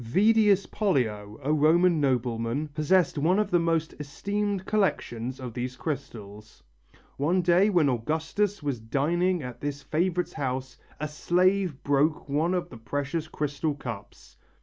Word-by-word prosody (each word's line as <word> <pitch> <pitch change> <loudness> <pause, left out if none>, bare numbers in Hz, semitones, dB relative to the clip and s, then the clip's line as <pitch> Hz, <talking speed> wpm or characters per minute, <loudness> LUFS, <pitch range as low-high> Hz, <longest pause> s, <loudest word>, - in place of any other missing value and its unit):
Vedius 205 - +4
Pollio, 110 - -1
a 150 +3 +1
Roman 160 +2 +4
nobleman, 125 +1 0
possessed 155 +2 +2
one 175 +6 +3
of 210 - 0
the 175 - +4
most 165 -1 0
esteemed 200 +6 -2
collections 130 - -1
of 125 -3 -6
these 125 +1 -4
crystals. 110 -8 -7 0.5
One 175 +6 +1
day 180 +4 +4
when 175 -7 +3
Augustus 160 - -1
was 140 -5 -2
dining 165 +9 0
at 125 -1 -8
this 145 0 -4
favourite's 175 +2 -1
house, 130 -3 -3 0.2
a 155 - -2
slave 180 +1 +1
broke 145 +3 +1
one 155 +6 +1
of 180 - -2
the 120 - -9
precious 145 +7 -3
crystal 150 0 -2
cups. 120 -7 -9
150 Hz, 140 wpm, -27 LUFS, 130-180 Hz, 0.5 s, Vedius